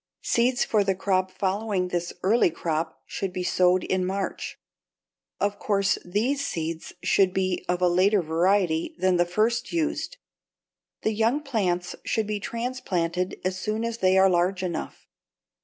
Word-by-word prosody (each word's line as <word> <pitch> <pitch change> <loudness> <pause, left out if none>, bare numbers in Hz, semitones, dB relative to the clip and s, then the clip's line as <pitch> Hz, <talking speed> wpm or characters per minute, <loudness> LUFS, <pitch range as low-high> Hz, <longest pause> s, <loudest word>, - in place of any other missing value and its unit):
Seeds 245 +1 +2
for 210 -2 +2
the 195 -1 +1
crop 185 -1 +1
following 190 0 -1
this 175 -1 -2
early 210 +1 +4
crop 160 0 -3
should 195 -2 -4
be 180 0 -3
sowed 180 0 +3
in 185 -1 0
March. 190 +1 -3 0.8
Of 205 0 -1
course 200 -2 +1
these 235 +10 0
seeds 165 - -4
should 190 -2 +3
be 185 -1 0
of 180 0 0
a - - +6
later 185 +2 +3
variety 170 - +1
than 185 -1 +2
the 175 0 +2
first 225 +6 0
used. 335 +8 -1 0.9
The 220 - +1
young 225 +7 +1
plants 185 -10 -1
should 220 - 0
be 210 0 -2
transplanted 195 -7 -2
as 185 0 -1
soon 215 +4 -2
as 230 0 -3
they 190 0 +4
are 190 0 +6
large 180 +1 +1
enough. 175 -3 -4
190 Hz, 155 wpm, -26 LUFS, 180-215 Hz, 0.9 s, a